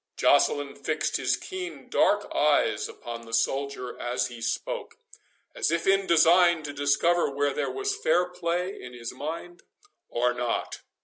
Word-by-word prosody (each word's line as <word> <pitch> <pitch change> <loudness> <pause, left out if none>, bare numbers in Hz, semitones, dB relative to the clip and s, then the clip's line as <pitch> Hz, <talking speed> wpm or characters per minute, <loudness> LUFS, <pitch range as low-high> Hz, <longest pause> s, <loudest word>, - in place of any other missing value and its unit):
Joceline 145 -1 +3
fixed - - -1
his - - +1
keen 370 -2 -7
dark - - +2
eyes 430 - +2
upon 120 - -8
the 115 -1 -3
soldier 135 -1 -2
as 120 +1 -1
he 120 -1 -10
spoke, - - -3 0.6
as - - 0
if 170 +1 0
in 195 0 +3
design 170 0 +5
to 145 -1 -5
discover 145 +5 +2
whether 140 0 0
there - - -1
was 405 0 -2
fair 445 - +2
play 180 +2 -3
in 125 0 -9
his 120 0 -7
mind 165 +6 -6 0.5
or 120 +1 +1
not. 120 -1 -2
155 Hz, 150 wpm, -27 LUFS, 125-180 Hz, 0.6 s, design